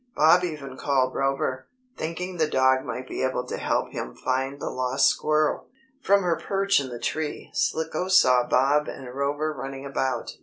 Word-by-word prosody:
Bob 165 +4 +5
even 145 -6 -5
called 130 -2 +1
Rover, 135 -1 -1 0.3
thinking 180 +3 -4
the 160 -2 +2
dog 130 -2 +3
might 130 +1 -5
be - - -4
able 130 -1 -1
to - - -5
help - - -1
him - - -6
find 135 +2 -2
the - - -4
lost 130 +1 +2
squirrel. 155 0 +1 0.3
From 200 -5 +3
her 170 -2 +1
perch 195 -2 +2
in 135 -2 -4
the 120 - -6
tree, 155 +5 -4
Slicko 160 +2 -1
saw 125 -10 +5
Bob 140 +4 +3
and 125 -2 -8
Rover 145 +3 -1
running 135 0 -7
about. 135 -1 -2
140 Hz, 175 wpm, -25 LUFS, 130-155 Hz, 0.3 s, Bob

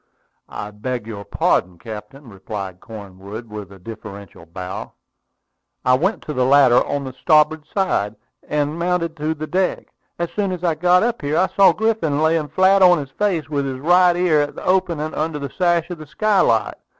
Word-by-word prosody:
"I 105 0 -6
beg 120 +2 -4
your 105 -3 -7
pardon, 90 -3 0
captain," 120 - -10
replied 95 -2 -7
Cornwood 100 +1 -9
with 105 -2 -8
a 100 - -12
deferential 100 -3 -10
bow. 90 +2 -7 0.9
"I 125 - +4
went 185 +11 -1
to 150 - -5
the 130 -2 +1
ladder 130 -2 +5
on 145 -1 -3
the 130 -1 -7
starboard 150 +1 +2
side, 155 - -1 0.3
and 150 +2 -1
mounted 170 -1 -1
to 155 +1 -2
this 155 0 -6
deck. 185 0 -1 0.2
As 170 -1 -3
soon 200 -2 -1
as 180 -1 -7
I 170 -2 +2
got 180 +4 +3
up 240 0 -1
here, 145 +2 -1
I 190 - +3
saw 195 - +7
Griffin 220 -10 0
lying 160 -1 +2
flat 190 +4 +3
on 180 -1 +7
his 140 -2 -6
face, 175 -3 -1
with 140 -3 -2
his 130 -1 -4
right 175 +4 +4
ear 175 -4 +3
at 145 - -3
the - - -8
opening 170 -4 0
under 155 0 -2
the 140 -2 -6
sash 175 -2 +2
of 175 - -6
the 155 - -10
skylight. 165 - +1
150 Hz, 185 wpm, -20 LUFS, 115-175 Hz, 0.9 s, saw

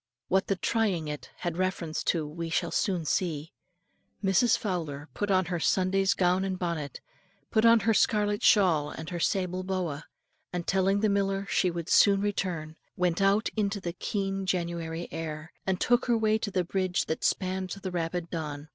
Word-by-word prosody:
What 190 +1 +2
the 195 - +1
trying 190 -6 0
it 150 -1 -6
had 175 -2 -2
reference 180 -4 -1
to 165 -3 +1
we 165 +3 -5
shall 160 - 0
soon 180 -5 0
see. 160 -1 -1 0.7
Mrs. 195 +5 +4
Fowler 160 -7 -4
put 205 - -2
on 185 -1 +3
her 175 0 -2
Sunday's 190 +3 +2
gown 180 +1 +2
and 190 -1 -2
bonnet, 170 -5 -3 0.5
put 220 0 +3
on 230 -1 +7
her 225 +3 +3
scarlet 210 -1 +2
shawl 170 -8 +4
and 160 +2 -7
her 175 - -3
sable 185 +1 0
boa, 180 -6 -3 0.5
and 175 -1 -3
telling 195 +1 +2
the 215 - +3
miller 195 0 0
she 185 - +3
would 170 -1 -5
soon 200 -1 +5
return, 180 -6 -2 0.2
went 180 0 +1
out 200 +3 +3
into 205 -1 0
the 175 -3 -4
keen 195 0 -2
January 170 -2 -2
air, 155 0 -6
and 190 -1 +1
took 245 0 +3
her 240 -1 +3
way 220 0 +2
to 215 - -2
the 185 -2 0
bridge 185 0 0
that 160 - -3
spanned 185 0 0
the 190 0 -5
rapid 170 0 -3
Don. 150 -2 -5
185 Hz, 180 wpm, -28 LUFS, 165-195 Hz, 0.7 s, on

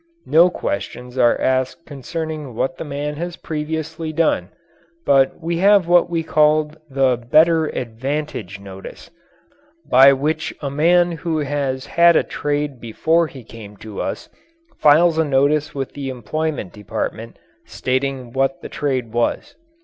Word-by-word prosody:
No 170 +3 +5
questions 125 - -5
are 120 -2 +3
asked 130 +5 -1
concerning 150 -1 -6
what 130 +3 -2
the - - -3
man 145 0 -4
has 175 +1 -4
previously 160 +1 -4
done, 155 - +1 0.6
but 135 -1 +3
we 170 0 -2
have 195 0 +4
what 175 0 +4
we 165 -1 -1
call 155 -1 +2 0.2
the 135 -2 +2
"Better 155 +7 +3
Advantage 125 -4 -4
Notice," 100 - -11 0.8
by 135 +2 +7
which 150 +4 -1
a 140 -2 -4
man 175 +4 +3
who 165 -1 -3
has 140 -3 -2
had 170 0 +4
a - - +4
trade 145 -2 -3
before 160 +9 +1
he 135 -5 -12
came 110 -2 -12
to 105 0 -7
us - - -4 0.5
files 160 +2 +5
a - - +4
notice 145 +1 +1
with 135 -2 -4
the 140 -2 -5
employment 130 - -3
department 105 -2 -5 0.3
stating 130 -1 -2
what 135 0 -1
the - - -7
trade 130 -6 -2
was. 120 - -1
145 Hz, 140 wpm, -20 LUFS, 130-160 Hz, 0.8 s, by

